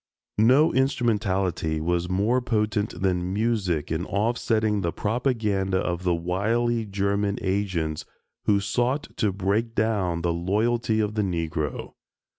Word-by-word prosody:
No 130 Hz, +8 st, +5 dB
instrumentality 105 Hz, -, 0 dB
was 85 Hz, +2 st, -1 dB
more 105 Hz, +7 st, +2 dB
potent 105 Hz, -4 st, -1 dB
than 90 Hz, -1 st, 0 dB
music 100 Hz, -8 st, 0 dB
in 80 Hz, +2 st, -1 dB
off 110 Hz, +4 st, 0 dB
setting 110 Hz, -3 st, +1 dB
the 85 Hz, -2 st, -1 dB
propaganda 105 Hz, -5 st, 0 dB
of 90 Hz, -1 st, -1 dB
the 90 Hz, -2 st, +1 dB
wily 110 Hz, +7 st, 0 dB
German 100 Hz, +1 st, 0 dB
agents, 90 Hz, -6 st, -1 dB, 0.4 s
who 100 Hz, -1 st, +4 dB
sought 125 Hz, +7 st, -1 dB
to 105 Hz, -, +1 dB
break 100 Hz, +4 st, -1 dB
down 100 Hz, -6 st, 0 dB
the 85 Hz, -1 st, +1 dB
loyalty 110 Hz, +6 st, +1 dB
of 105 Hz, 0 st, -1 dB
the 105 Hz, -, 0 dB
Negro. 80 Hz, -6 st, -3 dB
100 Hz, 130 wpm, -25 LUFS, 90-115 Hz, 0.4 s, No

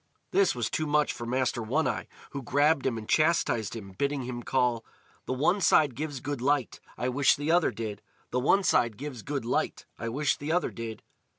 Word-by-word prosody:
This 195 Hz, -8 st, +3 dB
was 120 Hz, -3 st, -1 dB
too 155 Hz, -, -1 dB
much 150 Hz, 0 st, +2 dB
for 120 Hz, -, -6 dB
Master 125 Hz, -1 st, 0 dB
One 130 Hz, +9 st, 0 dB
eye, -, -, -2 dB, 0.2 s
who 140 Hz, -, -4 dB
grabbed 145 Hz, +3 st, +2 dB
him 120 Hz, -3 st, -1 dB
and 110 Hz, -1 st, -7 dB
chastised 155 Hz, -, +2 dB
him, 100 Hz, -4 st, -8 dB
bidding 140 Hz, +7 st, -1 dB
him 120 Hz, -1 st, -5 dB
call: 125 Hz, -2 st, +1 dB, 0.4 s
"The -, -, 0 dB
one 165 Hz, +10 st, +2 dB
side 150 Hz, -5 st, +4 dB
gives 145 Hz, 0 st, -4 dB
good 140 Hz, -1 st, -4 dB
light, 140 Hz, -2 st, +1 dB, 0.2 s
I 125 Hz, -, -1 dB
wish 130 Hz, +1 st, +4 dB
the 145 Hz, +3 st, -1 dB
other 175 Hz, 0 st, +4 dB
did! 110 Hz, -2 st, -5 dB, 0.3 s
The 125 Hz, -, +1 dB
one 195 Hz, +10 st, +3 dB
side 115 Hz, -, +2 dB
gives 135 Hz, -3 st, -6 dB
good 140 Hz, 0 st, -3 dB
light, 120 Hz, -, -1 dB
I 115 Hz, -, -3 dB
wish 140 Hz, +5 st, 0 dB
the 145 Hz, +2 st, -4 dB
other 180 Hz, +2 st, +1 dB
did!" 115 Hz, -1 st, -7 dB
130 Hz, 205 wpm, -28 LUFS, 120-150 Hz, 0.4 s, side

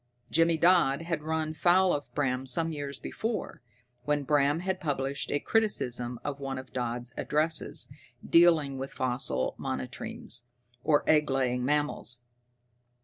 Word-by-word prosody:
Jimmy 165 Hz, +1 st, +3 dB
Dodd 165 Hz, -4 st, +4 dB
had 165 Hz, -2 st, -2 dB
run 155 Hz, 0 st, -2 dB
foul 180 Hz, +3 st, +3 dB
of 145 Hz, -, -4 dB
Bram 130 Hz, -2 st, -1 dB
some 165 Hz, +6 st, +2 dB
years 145 Hz, -3 st, -5 dB
before, 220 Hz, -, -4 dB, 0.4 s
when 150 Hz, 0 st, 0 dB
Bram 145 Hz, +2 st, +2 dB
had 190 Hz, 0 st, -2 dB
published 140 Hz, -3 st, -2 dB
a 145 Hz, -, +1 dB
criticism 125 Hz, -, +2 dB
of 140 Hz, -1 st, -4 dB
one 135 Hz, -1 st, -4 dB
of 130 Hz, 0 st, -9 dB
Dodd's 120 Hz, 0 st, -3 dB
addresses 155 Hz, +1 st, +1 dB, 0.4 s
dealing 160 Hz, -5 st, +4 dB
with 135 Hz, +1 st, -5 dB
fossil 125 Hz, -, -1 dB
monotremes, 120 Hz, -, -4 dB, 0.4 s
or 150 Hz, -2 st, +2 dB
egg 150 Hz, -1 st, +4 dB
laying 125 Hz, -2 st, 0 dB
mammals. 145 Hz, -3 st, -1 dB
145 Hz, 135 wpm, -29 LUFS, 130-165 Hz, 0.4 s, Dodd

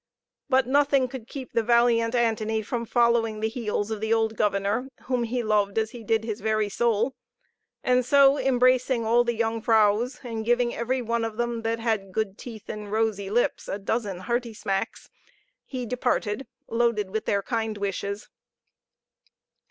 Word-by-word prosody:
But 260 Hz, -1 st, +4 dB
nothing 280 Hz, 0 st, +3 dB
could 245 Hz, -3 st, -8 dB
keep 265 Hz, -1 st, -8 dB
the 230 Hz, -, +3 dB
valiant 235 Hz, 0 st, +3 dB
Antony 220 Hz, -2 st, +1 dB
from 235 Hz, +1 st, -3 dB
following 235 Hz, -2 st, +2 dB
the 220 Hz, -, 0 dB
heels 220 Hz, -2 st, -2 dB
of 215 Hz, -1 st, -3 dB
the 220 Hz, 0 st, -1 dB
old 225 Hz, -1 st, +2 dB
governor, 205 Hz, +4 st, 0 dB, 0.2 s
whom 250 Hz, -2 st, 0 dB
he 245 Hz, +1 st, -2 dB
loved 210 Hz, -2 st, +1 dB
as 220 Hz, 0 st, +1 dB
he 240 Hz, -3 st, -9 dB
did 220 Hz, 0 st, +1 dB
his 225 Hz, -1 st, -4 dB
very 215 Hz, -1 st, +1 dB
soul: 235 Hz, +3 st, +1 dB, 0.9 s
so 275 Hz, +2 st, +5 dB
embracing 255 Hz, -2 st, +2 dB
all 235 Hz, +2 st, +4 dB
the 240 Hz, -1 st, -1 dB
young 225 Hz, 0 st, -1 dB
vrouws, 220 Hz, +2 st, +3 dB
and 225 Hz, -2 st, -4 dB
giving 240 Hz, +1 st, +2 dB
every 250 Hz, +2 st, -1 dB
one 235 Hz, 0 st, -1 dB
of 225 Hz, -1 st, -4 dB
them, 240 Hz, -1 st, -1 dB
that 225 Hz, 0 st, -1 dB
had 220 Hz, -4 st, -1 dB
good 200 Hz, -1 st, -2 dB
teeth 225 Hz, -4 st, -9 dB
and 210 Hz, -1 st, -6 dB
rosy 215 Hz, -3 st, 0 dB
lips, 240 Hz, +4 st, 0 dB
a -, -, -2 dB
dozen 205 Hz, -2 st, -2 dB
hearty 235 Hz, +1 st, -2 dB
smacks, 195 Hz, -2 st, -3 dB, 0.6 s
he 255 Hz, -2 st, -4 dB
departed, 245 Hz, -1 st, -1 dB, 0.2 s
loaded 230 Hz, -4 st, 0 dB
with 220 Hz, +1 st, -2 dB
their 200 Hz, -1 st, +1 dB
kind 225 Hz, -2 st, -2 dB
wishes. 200 Hz, 0 st, -3 dB
225 Hz, 165 wpm, -26 LUFS, 215-240 Hz, 0.9 s, so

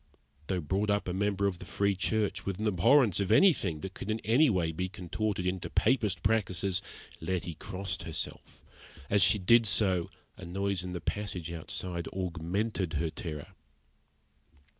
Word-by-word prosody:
Though 90 Hz, -2 st, -1 dB
brought 95 Hz, +7 st, -1 dB
up 100 Hz, -1 st, +1 dB
a 90 Hz, -, -1 dB
member 100 Hz, +1 st, 0 dB
of 95 Hz, -3 st, -1 dB
the -, -, -9 dB
Free 100 Hz, +3 st, +1 dB
Church, 105 Hz, +2 st, 0 dB
with 95 Hz, -2 st, -3 dB
an 110 Hz, -, -3 dB
abhorrence 105 Hz, -, +4 dB
of 100 Hz, -2 st, 0 dB
anything 100 Hz, -, +4 dB
that 95 Hz, +3 st, -6 dB
could 100 Hz, -, -7 dB
in 110 Hz, +1 st, 0 dB
any 130 Hz, +7 st, +4 dB
way 90 Hz, -6 st, +1 dB
be 90 Hz, +3 st, -3 dB
contorted 95 Hz, +1 st, -3 dB
into 90 Hz, -1 st, -2 dB
Papist 110 Hz, -4 st, +1 dB
practices, 100 Hz, -3 st, +1 dB, 0.4 s
Letty 90 Hz, 0 st, -2 dB
crossed 95 Hz, +4 st, -5 dB
herself. -, -, -6 dB, 0.5 s
As 100 Hz, 0 st, +4 dB
she 90 Hz, -, +5 dB
did 115 Hz, +4 st, +5 dB
so, 95 Hz, -5 st, +2 dB, 0.3 s
a -, -, -11 dB
noise 95 Hz, +1 st, -1 dB
in 90 Hz, 0 st, -5 dB
the 90 Hz, -, -4 dB
passage 90 Hz, -4 st, -3 dB
outside 85 Hz, +1 st, -4 dB
augmented 90 Hz, +1 st, -2 dB
her 80 Hz, +1 st, -1 dB
terror. 75 Hz, -4 st, -6 dB
95 Hz, 160 wpm, -30 LUFS, 90-105 Hz, 0.5 s, she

